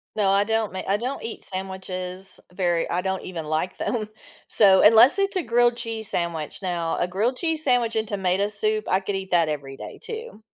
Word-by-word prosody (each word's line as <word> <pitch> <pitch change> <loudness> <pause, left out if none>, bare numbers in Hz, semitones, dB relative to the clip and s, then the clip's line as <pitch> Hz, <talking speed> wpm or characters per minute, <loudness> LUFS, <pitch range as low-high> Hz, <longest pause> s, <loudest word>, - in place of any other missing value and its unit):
No, 200 -2 +2
I 200 +1 +4
don't 225 -2 0
ma 185 - -3
I 200 - +2
don't 255 +5 -4
eat 225 - -6
sandwiches 190 0 -6
very 175 -2 0
I 180 +1 0
don't 190 0 -2
even 170 -4 -6
like 155 +4 -2
them. 215 -3 -2 0.4
So 195 -3 +5
unless 230 - +7
it's 395 0 +1
a 360 - 0
grilled 240 -1 +3
cheese 225 -2 -4
sandwich. 165 -3 -3
Now, 170 -3 -1
a - - 0
grilled 215 +8 0
cheese 325 -2 -1
sandwich 245 -4 +2
and 220 0 0
tomato 195 -1 0
soup, 215 +1 -1
I 185 - +3
could 195 0 -3
eat 190 -1 -5
that 170 -2 +4
every 135 -2 -5
day - - -9
too. 450 - -7
195 Hz, 205 wpm, -24 LUFS, 180-225 Hz, 0.4 s, unless